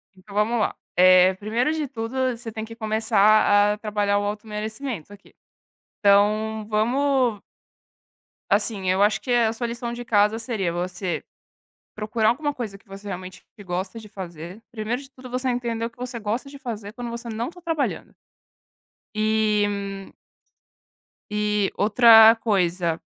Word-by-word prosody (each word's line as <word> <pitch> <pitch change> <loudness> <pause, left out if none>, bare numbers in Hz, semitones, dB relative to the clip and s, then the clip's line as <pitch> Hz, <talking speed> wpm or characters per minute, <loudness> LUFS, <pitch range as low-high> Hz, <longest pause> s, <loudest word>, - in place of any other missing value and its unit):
então 195 +2 -15
vamos 220 +3 +1
lá. 215 - 0 0.2
Eh, 185 +1 +6
primeiro 225 +8 -1
de 310 -2 -2
tudo, 255 +1 -2
você 230 -1 -8
tem 220 0 -5
que 225 0 -11
começar 215 -2 +3
a - - -6
trabalhar 205 -1 0
o - - -2
auto 210 +2 -4
merecimento 215 - -5
aqui. 200 - -18 0.7
Então 210 +2 +2
vamos 245 +1 +1 1.1
Assim, 195 -5 +1
eu 190 +2 +3
acho 205 -1 +2
que 250 - -4
a 235 -2 +3
sua 235 +1 -3
lição 235 0 -5
de 240 0 -6
casa 210 -1 +2
seria 215 -7 -2
você 180 -1 -3 0.7
procurar 215 +1 +1
alguma 290 +4 -1
coisa 225 -7 -6
que 200 +2 -25
você 195 +1 -11
realmente 185 -1 -7 0.2
gosta 185 +2 -4
de 215 - -13
fazer. 175 0 -8
Primeiro 230 +2 -3
de 275 - -13
tudo, 255 -2 -13
você 255 +1 -2
entender 235 -2 -2
o 230 - -3
que - - -31
você 250 -1 -5
gosta 225 +5 -3
de 280 - -11
fazer 220 -7 -6
quando 245 +1 -6
você 235 0 -6
não 230 +2 -3
tá 355 +1 -12
trabalhando. 325 -4 -2 1.0
E 205 -2 0 1.2
e 210 -1 0
outra 225 +1 +7
coisa 180 -6 0
215 Hz, 155 wpm, -24 LUFS, 200-235 Hz, 1.2 s, outra